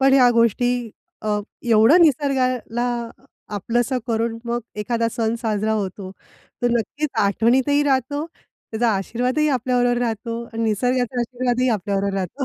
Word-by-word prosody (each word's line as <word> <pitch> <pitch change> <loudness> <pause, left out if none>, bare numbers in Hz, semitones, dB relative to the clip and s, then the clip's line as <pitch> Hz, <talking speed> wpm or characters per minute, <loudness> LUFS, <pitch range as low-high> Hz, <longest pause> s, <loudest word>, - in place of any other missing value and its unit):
पण 270 0 +4
ह्या 250 -2 +6
गोष्टी 235 +1 +1 0.3
अ, 210 -1 0 0.3
एवढं 225 +11 +6
निसर्गाला 255 -5 +1 0.7
आपलंसं 240 +5 0
करून 230 0 -1
मग 240 +1 -1 0.2
एखादा 230 +1 0
सण 225 -1 0
साजरा 215 0 0
होतो. 195 -2 -3 0.5
तर 240 - +2
नक्कीच 240 +6 -1
आठवणीतही 255 +8 +2
राहतो, 285 +2 0
त्याचा 235 -7 -5
आशीर्वादही 250 +9 0
आपल्याबरोबर 245 -2 +1
राहतो. 230 0 -3
आणि 225 0 -3
निसर्गाचा 245 +3 0
आशीर्वादही 250 +1 0
आपल्याबरोबर 200 -1 -1
राहतो. 195 - -3
240 Hz, 125 wpm, -21 LUFS, 220-255 Hz, 0.7 s, ह्या